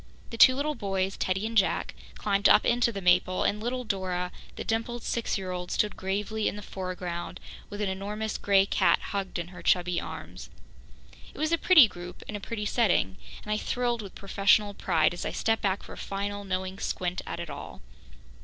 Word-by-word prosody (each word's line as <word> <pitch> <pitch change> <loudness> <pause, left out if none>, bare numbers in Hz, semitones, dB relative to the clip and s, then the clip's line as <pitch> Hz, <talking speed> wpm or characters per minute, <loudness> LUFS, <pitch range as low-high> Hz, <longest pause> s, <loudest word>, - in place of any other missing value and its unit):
The 230 - -6
two 255 +3 +8
little 295 +3 -1
boys, 195 -5 -2
Teddy 190 +3 -1
and 225 +1 -4
Jack, 195 -3 +2 0.2
climbed 200 -1 +2
up - - +6
into 240 0 +3
the 195 -3 -6
maple, 180 +1 +3
and 210 +1 0
little 250 +2 -2
Dora, 185 -4 -2 0.2
the - - -5
dimpled 230 +1 -2
six 235 -2 -1
year 190 -1 -4
old, 180 0 -4
stood 210 - 0
gravely 205 +3 -2
in - - -1
the 205 - -8
foreground 180 -2 -5 0.3
with 205 0 -6
an 205 - 0
enormous 210 +3 -3
grey 195 -1 +4
cat - - +3
hugged 195 -2 -2
in 170 0 -4
her 180 - -11
chubby 180 -1 +2
arms. - - -8 0.8
It - - -17
was 310 +1 0
a - - +5
pretty 320 -10 +8
group 175 -2 -10
in 210 - -5
a - - -3
pretty 210 +1 -4
setting, 175 - +2 0.3
and 210 - -5
I 210 - +2
thrilled 240 0 -1
with 200 -3 -10
professional 205 +1 +2
pride 165 -4 +2
as 175 - -5
I - - -1
stepped 225 0 0
back 195 0 0
for - - -10
a - - -11
final, 205 +1 -4
knowing 190 0 -3
squint 180 0 -2
at - - -4
it 170 -3 -5
all. 140 - -9
200 Hz, 200 wpm, -28 LUFS, 185-220 Hz, 0.8 s, two